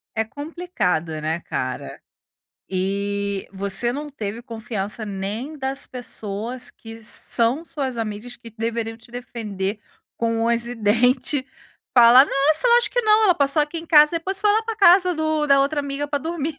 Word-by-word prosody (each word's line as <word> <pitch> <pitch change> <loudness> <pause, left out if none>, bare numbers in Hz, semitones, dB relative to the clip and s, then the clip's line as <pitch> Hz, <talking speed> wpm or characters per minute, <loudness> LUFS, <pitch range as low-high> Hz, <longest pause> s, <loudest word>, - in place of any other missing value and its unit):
É 220 - +1
complicado 225 - -3
né, 160 +2 -1
cara? - - -5 0.7
E 200 +1 -2
você 200 +5 0
não 295 +2 -5
teve 225 -2 -6
confiança 220 -3 -5
nem 210 +9 -5
das 270 0 -2
pessoas 235 0 -5
que 225 0 -12
são 235 +7 0
suas 270 -7 -4
amigas 225 +2 -5
que 235 -1 -13
deveriam 225 0 -3
te 230 +1 -20
defender 215 -5 -5 0.4
com 230 -1 0
unhas 235 0 +1
e 245 - -5
dente, 250 +5 +1 0.5
falar: 245 +2 +9
"Nossa, 300 - +3
eu - - +5
acho 485 - -1
que - - +1
não, 435 0 +4
ela 365 - +5
passou 280 +1 +2
aqui 300 +3 -1
em 330 - -9
casa, 300 -1 +6
depois 380 +4 -2
foi 420 0 +3
lá 435 +2 +2
para 450 0 -4
casa 365 -2 +6
do 315 -1 0
da 275 -1 +5
outra 290 +2 +1
amiga 285 0 -3
para 285 -1 -2
dormir". 320 -2 -3
245 Hz, 165 wpm, -22 LUFS, 215-300 Hz, 0.7 s, falar